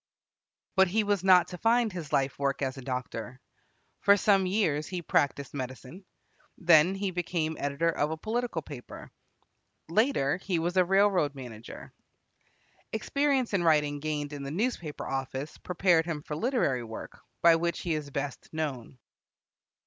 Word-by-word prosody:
But 190 -1 +5
he 215 +5 +1
was 205 -3 0
not 185 -2 +6
to 180 - -8
find 230 0 +2
his 165 -5 -6
life 135 0 0
work 140 0 0
as 130 -1 -2
a 135 - -8
doctor. 125 -1 -5 0.6
For 200 0 +5
some 195 -2 +3
years 165 -7 +1
he 180 -2 -5
practised 140 -3 0
medicine. 130 +7 -7 0.5
Then 170 +1 +5
he 195 -1 -2
became 170 -3 -2
editor 145 +4 0
of 150 -2 0
a 160 - -3
political 220 -2 -2
paper. 135 -5 -10 0.8
Later, 170 - +2
he 185 -1 -2
was 175 +2 -1
a 185 - +5
railroad 190 -6 +3
manager. 120 -4 -10 1.0
Experience 270 +2 0
in 190 -3 +2
writing 150 -3 +2
gained 150 -1 -3
in 145 - -6
the 140 - -5
newspaper 175 - -2
office 135 +2 -4
prepared 175 -2 +2
him 150 -3 -3
for 150 - -5
literary 155 - 0
work, 110 -1 -9 0.2
by 170 -1 +8
which 170 +1 -2
he 170 - -1
is 150 -2 -3
best 140 0 -5
known. 140 -6 -4
160 Hz, 155 wpm, -29 LUFS, 140-190 Hz, 1.0 s, by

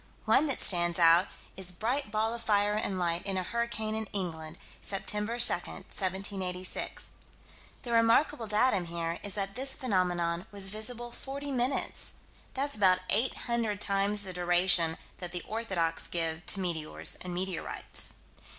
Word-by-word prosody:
One 310 - +4
that 275 - 0
stands 175 -2 +3
out 170 +2 +6 0.3
is 185 -1 +1
"bright 235 +8 -1
ball 220 +2 0
of 235 - -5
fire 205 -2 +2
and 210 -2 -1
light 170 -1 -1
in 195 -1 -1
a 185 - -1
hurricane 225 0 -2
in 220 -1 -3
England, 165 -4 -3 0.3
Sept. 195 -1 -4
2, 210 - +3
1786." 190 -5 0 0.7
The 240 - -5
remarkable 230 +2 +3
datum 210 -3 +2
here 170 0 -3
is 205 - -2
that 195 -1 -2
this 265 +3 +3
phenomenon 180 -6 0
was 200 -1 +1
visible 240 +3 -3
forty 280 +3 -6
minutes. 255 +1 -1 0.4
That's 280 +2 0
about 185 -3 +4
800 230 -1 0
times 200 0 +1
the 185 -2 -6
duration 175 -2 +3 0.2
that 180 -1 -6
the 180 - -3
orthodox 190 -7 -1
give 165 0 -2
to 195 - +2
meteors 165 -4 -1
and 180 - -6
meteorites. 180 0 -2
195 Hz, 145 wpm, -30 LUFS, 175-230 Hz, 0.7 s, out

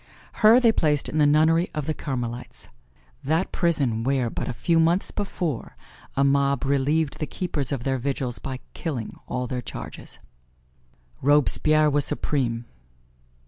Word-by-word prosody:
Her 220 +3 +8
they 235 -3 +5
placed 150 -8 +1
in 155 - -1
the 150 - +5
nunnery 160 +4 +3
of 150 -2 -2
the 155 - -1
Carmelites 120 -4 -5 0.5
that 160 +6 0
prison 140 -10 +1
where, 130 -2 0
but - - -4
a - - -1
few 165 +8 +1
months 170 +4 +2
before, 175 - -4 0.4
a 140 - +4
mob 140 -1 +2
relieved 140 +2 +1
the 155 - -2
keepers 155 -6 -3
of 135 -4 -2
their 135 0 0
vigils 130 -2 -2
by 130 -1 -6
killing 135 -10 -5
all 125 0 -2
their 125 0 -3
charges. - - -8 1.0
Robespierre 150 +2 +4
was 145 0 +2
supreme. 120 -5 -1
140 Hz, 145 wpm, -24 LUFS, 130-160 Hz, 1.0 s, Her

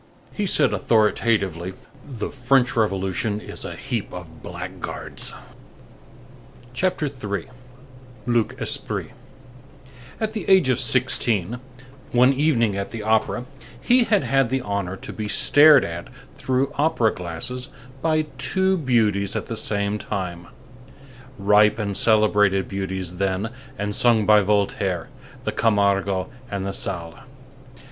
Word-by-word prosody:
He - - -2
said - - +3
authoritatively: 100 -5 +1 0.3
"The 125 -7 -6
French 130 -1 +2
Revolution 100 -1 0
is - - -8
a - - -6
heap - - -4
of - - -10
blackguards." - - -6 1.4
CHAPTER 180 +3 0
III—LUC 125 0 -5
ESPRIT - - -2 1.1
At 220 -1 -2
the 215 - -4
age 190 -8 +5
of 130 -1 +2
sixteen, 120 -4 +1 0.5
one 125 +2 +5
evening 130 -8 +2
at 100 0 -3
the 115 -2 -6
opera, 110 +3 +1 0.3
he 245 - +3
had 210 -4 +2
had 135 -3 +2
the 130 +1 0
honor 100 -4 -3
to - - -9
be 110 -1 -4
stared 145 +6 +6
at 85 +1 -6 0.3
through 130 +2 0
opera 145 -8 +2
glasses 90 - -5 0.3
by 155 -1 +1
two 190 +7 +1
beauties 105 -8 +1
at - - -2
the 115 - -5
same 105 -1 -1
time—ripe 115 +3 -2
and 100 -3 -2
celebrated 105 -3 +3
beauties 95 -2 -4
then, 100 +3 -1 0.3
and 105 0 -2
sung 115 -1 +3
by 105 0 +6
Voltaire, 95 -4 0 0.3
the - - -1
Camargo 100 -3 +1 0.2
and 100 -1 -3
the 100 - -2
Sallé. 85 -2 -4
110 Hz, 120 wpm, -23 LUFS, 100-130 Hz, 1.4 s, stared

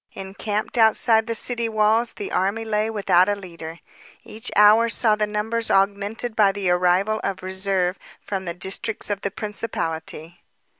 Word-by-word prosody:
Encamped 205 +4 -4
outside 220 0 +4
the 230 - -1
city 235 0 0
walls 220 +2 +1
the 205 - -6
army 200 +5 -1
lay 215 0 0
without 200 -4 +3
a 205 - +1
leader. 170 -4 -9 0.5
Each 220 +1 -5
hour 215 +3 +6
saw 225 -1 +2
the 210 0 -1
numbers 220 +2 -2
augmented 200 +4 0
by 205 -3 +4
the 195 -2 -1
arrival 180 +4 +2
of 190 -1 -3
reserves 190 -1 -1 0.2
from 190 -2 -5
the 170 -1 -4
districts 195 +4 -3
of 200 -1 -2
the - - -2
principality. 175 -6 -5
205 Hz, 155 wpm, -22 LUFS, 190-220 Hz, 0.5 s, hour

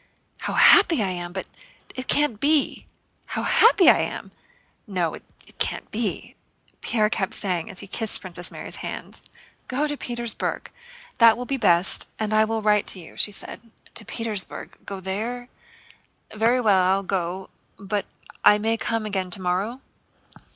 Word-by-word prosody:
How - - -3
happy 335 - +6
I 190 - 0
am! 175 -1 -5
But 190 +1 -5 0.5
it 255 0 -6
can't 290 -8 +2
be.... 290 +2 +2 0.4
How - - -3
happy 440 -5 +5
I - - +8
am! - - -4 0.6
No, 180 -5 -1
it - - -9 0.4
can't - - -2
be!" - - -3 0.5
Pierre 215 -3 +2
kept 200 -3 -2
saying 180 -5 -2
as 185 - -8
he - - -8
kissed 220 +2 0
Princess 175 -1 -2
Mary's - - 0
hands. - - -7 0.5
"Go 275 +4 0
to 295 -1 -2
Petersburg, 240 -4 -4 0.5
that 230 -1 +7
will 250 - -4
be 275 - -1
best. 180 -6 +2
And 215 -1 -2
I 215 0 +5
will 225 0 -2
write 210 -1 +3
to 190 - -5
you," 165 - -12
she 205 - +1
said. 200 - -6 0.3
"To 220 - -6
Petersburg? 215 -2 -5
Go 195 -1 -6
there? 230 +6 -4 0.8
Very 230 +4 +2
well, 205 -6 +4
I'll 190 +2 +2
go. 185 0 -3 0.3
But 200 0 -3 0.4
I 210 - +7
may 225 +2 0
come 225 -1 -2
again 190 -3 -2
tomorrow?" 190 +7 -2
210 Hz, 160 wpm, -24 LUFS, 190-235 Hz, 0.8 s, I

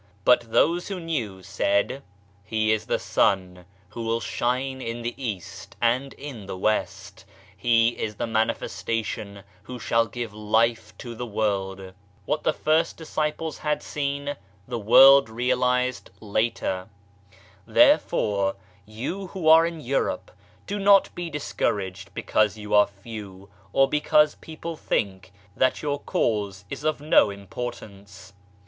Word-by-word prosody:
" 100 - -33
But 120 -2 +4
those 170 +8 +2
who 195 -2 -4
knew 120 - -4
said: 100 +7 0 0.2
" 100 0 -33
He 110 +1 0
is 110 -1 0
the - - +1
Sun 90 -2 0 0.2
who 115 +4 -7
will 115 0 0
shine 130 +3 -2
in 115 0 -5
the 120 +1 -2
East 110 -9 -6
and 125 +3 +1
in 130 -8 -9
the 95 - -5
West, 110 +3 -2 0.3
He 115 -1 +3
is 110 -2 -5
the - - -2
Manifestation 110 -2 -2 0.2
who 125 +5 -8
shall 115 0 +1
give 115 -1 -6
Life 110 +1 0
to 120 - -7
the 120 +1 -6
World." 95 -3 -2 0.3
What 150 +5 -1
the - - +2
first 155 +2 +1
disciples 155 0 -3
had 150 -1 -1
seen 140 0 -3 0.3
the 120 -1 -3
World 135 +4 +7
realized 125 +2 0
later. 105 -3 -1 0.8
Therefore, 105 - +3 0.3
you 135 - -5
who 180 -4 -4
are 165 +1 +7
in 165 -2 -6
Europe, 135 +1 -1 0.3
do 205 +1 -3
not 200 0 +5
be 175 -1 -5
dis 150 -2 -6
couraged 95 -1 -2
because 110 0 +1
you 105 -1 -6
are 105 0 +6
few 100 -1 -10 0.2
or 135 +4 +4
because 150 +1 +3
people 165 +1 -8
think 95 - -2 0.2
that 130 +3 +1
your 145 -1 -1
Cause 100 -7 -1
is - - -6
of 155 -2 0
no 150 -7 +5
importance. 100 -1 -8
115 Hz, 140 wpm, -25 LUFS, 100-140 Hz, 0.8 s, World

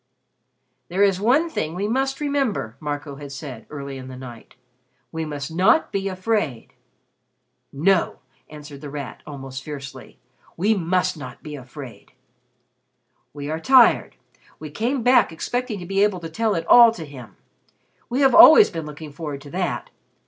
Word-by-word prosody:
"There 190 +4 +1
is 195 -2 +2
one 270 +10 +3
thing 160 - -4
we 200 +3 -2
must 270 +4 -1
remember," 270 - -1
Marco 145 -1 -5
had 145 -1 -9
said, 135 -4 -8
early 140 -2 -7
in 130 - -9
the 130 -1 -9
night. 120 -3 -11 0.6
"We 160 -1 -4
must 145 -2 -6
not 190 - +3
be 195 0 -2
afraid." 185 - -2 1.0
"No," 170 +5 +1 0.3
answered 150 -2 -11
The 145 - -7
Rat, 140 -2 -7
almost 135 -2 -7
fiercely, 135 -2 -9 0.4
"we 205 +6 +2
must 180 -2 0
not 130 -4 -10
be 150 - -8
afraid." 130 -1 -11 1.2
"We 145 0 -7
are 160 - -3
tired; 255 +5 +4 0.4
we 155 -2 -9
came 240 - -2
back 245 -6 +4
expecting 245 +7 -3
to 175 - -8
be 195 +2 +1
able 205 -3 +1
to 165 - -6
tell 220 +4 0
it 165 -1 -3
all 235 +4 +8
to 165 -7 -8
him. 130 -6 -12 0.7
We 250 +4 -1
have 270 -1 +4
always 335 +5 +9
been 165 -3 -5
looking 150 0 -9
forward 145 -1 -6
to 140 0 -12
that. 180 0 -3
160 Hz, 160 wpm, -22 LUFS, 140-210 Hz, 1.2 s, always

